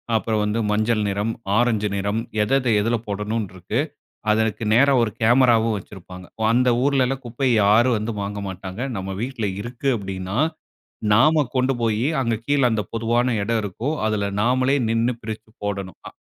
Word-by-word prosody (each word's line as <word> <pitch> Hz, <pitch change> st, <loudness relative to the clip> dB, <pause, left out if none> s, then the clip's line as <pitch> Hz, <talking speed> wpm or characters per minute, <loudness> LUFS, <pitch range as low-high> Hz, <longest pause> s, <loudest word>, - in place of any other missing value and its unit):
அப்புறம் 110 Hz, -1 st, 0 dB
வந்து 105 Hz, +2 st, 0 dB
மஞ்சள் 110 Hz, +1 st, +1 dB
நிறம், 100 Hz, +3 st, -1 dB, 0.3 s
ஆரஞ்சு 110 Hz, -3 st, +2 dB
நிறம், 100 Hz, +2 st, -1 dB, 0.2 s
எதெத 135 Hz, +5 st, +1 dB
எதுல 115 Hz, +3 st, +1 dB
போடணுன்ருக்கு. 105 Hz, -3 st, -3 dB, 0.5 s
அதற்கு 110 Hz, +1 st, 0 dB
நேரா 140 Hz, +4 st, +5 dB
ஒரு 115 Hz, -3 st, 0 dB
கேமராவும் 115 Hz, -2 st, +4 dB
வச்சிருப்பாங்க. 90 Hz, -1 st, -11 dB, 0.3 s
அந்த 125 Hz, +2 st, +3 dB
ஊர்லலாம் 135 Hz, -1 st, +1 dB
குப்பைய, 125 Hz, +2 st, 0 dB
யாரும் 115 Hz, +4 st, +4 dB
வந்து 110 Hz, +2 st, -3 dB
வாங்க 100 Hz, +1 st, -4 dB
மாட்டாங்க. 95 Hz, +2 st, -7 dB, 0.2 s
நம்ம 95 Hz, 0 st, -4 dB
வீட்டுல 120 Hz, -4 st, -2 dB
இருக்கு 120 Hz, +4 st, -3 dB
அப்படின்னா, 95 Hz, +1 st, -5 dB, 0.8 s
நாம 150 Hz, +7 st, +5 dB
கொண்டு 130 Hz, +1 st, +2 dB
போயி 115 Hz, +1 st, +1 dB, 0.2 s
அங்க 115 Hz, -2 st, 0 dB
கீழ 145 Hz, +1 st, +2 dB
அந்த 110 Hz, -1 st, 0 dB
பொதுவான 115 Hz, +1 st, +1 dB
இடம் 110 Hz, +2 st, 0 dB
இருக்கும், 110 Hz, -, -3 dB
அதுல 105 Hz, -2 st, -1 dB
நாமளே 130 Hz, +4 st, +2 dB
நின்னு 115 Hz, +2 st, +1 dB
பிரிச்சு 110 Hz, 0 st, -7 dB, 0.2 s
போடணும். 100 Hz, -2 st, -4 dB
அ, -, -, -18 dB
110 Hz, 150 wpm, -22 LUFS, 105-125 Hz, 0.8 s, நேரா